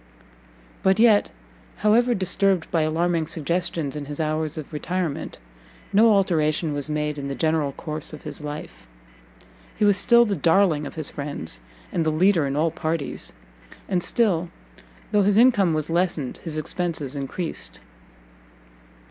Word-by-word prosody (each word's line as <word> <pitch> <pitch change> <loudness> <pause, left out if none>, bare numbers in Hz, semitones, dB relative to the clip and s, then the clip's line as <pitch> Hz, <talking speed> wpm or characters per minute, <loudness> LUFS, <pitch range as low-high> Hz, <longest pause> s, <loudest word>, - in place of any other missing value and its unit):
But 190 0 +3
yet, 220 -2 +5 0.5
however 235 +4 +3
disturbed 190 -1 +1
by 165 - +2
alarming 165 +1 0
suggestions 165 -2 -2
in 150 -1 -5
his 145 +1 -7
hours 155 0 -1
of 155 0 -8
retirement, 170 0 -3 0.6
no 220 +3 +6
alteration 160 -5 +1
was 145 +1 -3
made 150 -1 -2
in 140 - -4
the 140 - -4
general 155 -3 0
course 155 0 -4
of 155 - -10
his - - -5
life; 145 - -8 0.9
he 215 - +2
was 205 -1 +5
still 235 +3 +6
the 205 -3 -1
darling 165 -2 +2
of - - -10
his 155 -3 -4
friends, 140 - -4 0.3
and 170 - 0
the 160 - +1
leader 165 -1 +3
in 135 - -2
all 160 +2 +1
parties, 160 -3 -3 0.6
and 185 -2 0
still, 180 -6 +1 0.6
though 210 - +4
his 200 +1 +3
income 205 -9 +4
was 155 -1 -2
lessened, 165 -5 -1
his 155 -2 -4
expences 155 -3 -3
encreased. 135 - -4
160 Hz, 150 wpm, -23 LUFS, 150-190 Hz, 0.9 s, no